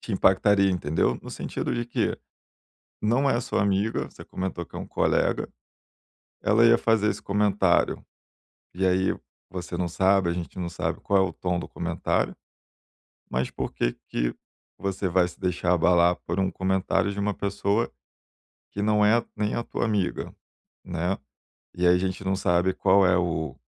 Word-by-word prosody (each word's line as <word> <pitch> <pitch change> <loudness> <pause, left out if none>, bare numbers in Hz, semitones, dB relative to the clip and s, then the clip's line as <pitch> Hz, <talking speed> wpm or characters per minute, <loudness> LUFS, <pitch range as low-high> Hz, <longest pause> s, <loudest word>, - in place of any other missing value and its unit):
te 110 - -6
impactaria, 100 +1 +4
entendeu? 75 -7 0
No - - -9
sentido - - -3
de 120 0 -1
que 120 - -1 0.8
não 125 +6 +2
é 120 -2 +2
sua 115 - -1
amiga, 100 +2 +1
você - - -12
comentou 95 -2 -4
que - - -11
é - - -3
um - - -6
colega, - - +1 0.9
ela 110 +3 +4
ia 115 0 +7
fazer 110 -2 +2
esse - - -5
comentário 100 -3 +2 0.7
e 95 +1 0
aí 95 +1 +2 0.3
você 90 -2 -5
não 90 -1 0
sabe, 95 +1 +2
a - - 0
gente 85 0 -6
não 85 -1 -3
sabe - - -3
qual 100 -1 +2
é 95 - -3
o - - -10
tom 90 0 -2
do - - -6
comentário, 85 -1 -1 0.9
mas 65 +1 -1
por - - -4
que - - 0 0.2
que - - -1 0.4
você 95 -1 -2
vai 90 0 +3
se 85 - -13
deixar 90 -1 0
abalar 85 +1 +4
por 85 +3 -2
um 95 -1 +2
comentário 95 +2 0
de 100 - -5
uma 100 0 0
pessoa 100 +3 -1 0.8
que 100 - -4
não 105 0 +3
é 115 +3 +4
nem 105 0 -1
a 120 - -1
tua 120 - -2
amiga, 105 -4 -1 0.5
né. 90 +2 -2 0.6
E 90 0 +1
aí 90 - +6
a - - +3
gente 95 0 -3
não 95 0 +1
sabe 90 0 +2
qual 95 0 +4
é 90 0 +4
o 80 -4 -2
95 Hz, 175 wpm, -26 LUFS, 90-100 Hz, 0.9 s, ia